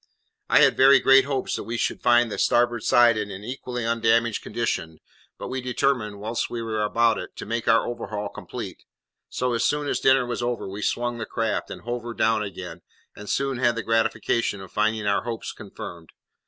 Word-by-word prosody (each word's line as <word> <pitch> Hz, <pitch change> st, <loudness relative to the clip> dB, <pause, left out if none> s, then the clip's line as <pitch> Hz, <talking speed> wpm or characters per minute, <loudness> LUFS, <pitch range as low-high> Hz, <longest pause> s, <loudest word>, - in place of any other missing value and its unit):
I -, -, +6 dB
had -, -, +5 dB
very 135 Hz, +1 st, +7 dB
great 135 Hz, 0 st, +6 dB
hopes 135 Hz, -2 st, -2 dB
that -, -, -4 dB
we 115 Hz, +3 st, -4 dB
should 115 Hz, -, -2 dB
find 120 Hz, -1 st, +4 dB
the -, -, -4 dB
starboard 120 Hz, -1 st, +2 dB
side 120 Hz, 0 st, +5 dB
in 105 Hz, -1 st, -3 dB
an 100 Hz, 0 st, -8 dB
equally 125 Hz, 0 st, -5 dB
undamaged 115 Hz, 0 st, +2 dB
condition; 95 Hz, -8 st, -3 dB, 0.4 s
but -, -, -6 dB
we 130 Hz, +1 st, -3 dB
determined, 125 Hz, -4 st, -1 dB
whilst 110 Hz, +3 st, -2 dB
we 120 Hz, -, -4 dB
were 110 Hz, -1 st, -2 dB
about 115 Hz, +2 st, +2 dB
it, -, -, -8 dB
to -, -, -7 dB
make 115 Hz, 0 st, -3 dB
our 115 Hz, -, +4 dB
overhaul 105 Hz, -3 st, -4 dB
complete, -, -, -8 dB, 0.5 s
so, 125 Hz, -1 st, -1 dB
as 115 Hz, -, 0 dB
soon 145 Hz, 0 st, 0 dB
as -, -, 0 dB
dinner 130 Hz, -1 st, +4 dB
was 120 Hz, 0 st, -3 dB
over, 120 Hz, -3 st, -2 dB
we 100 Hz, +2 st, -6 dB
swung 120 Hz, +2 st, -1 dB
the 110 Hz, -, -4 dB
craft, 115 Hz, -1 st, -2 dB
and -, -, -8 dB
hove 120 Hz, +1 st, -4 dB
her 120 Hz, 0 st, -7 dB
down 110 Hz, -1 st, +2 dB
again, 90 Hz, -4 st, -7 dB, 0.3 s
and 105 Hz, -, -9 dB
soon 135 Hz, -2 st, -1 dB
had 120 Hz, -2 st, +2 dB
the 115 Hz, -, -3 dB
gratification 115 Hz, -1 st, 0 dB
of 95 Hz, -2 st, -11 dB
finding 110 Hz, 0 st, 0 dB
our 100 Hz, 0 st, +2 dB
hopes 115 Hz, -1 st, -5 dB
confirmed. 85 Hz, -2 st, -10 dB
115 Hz, 205 wpm, -24 LUFS, 105-120 Hz, 0.5 s, very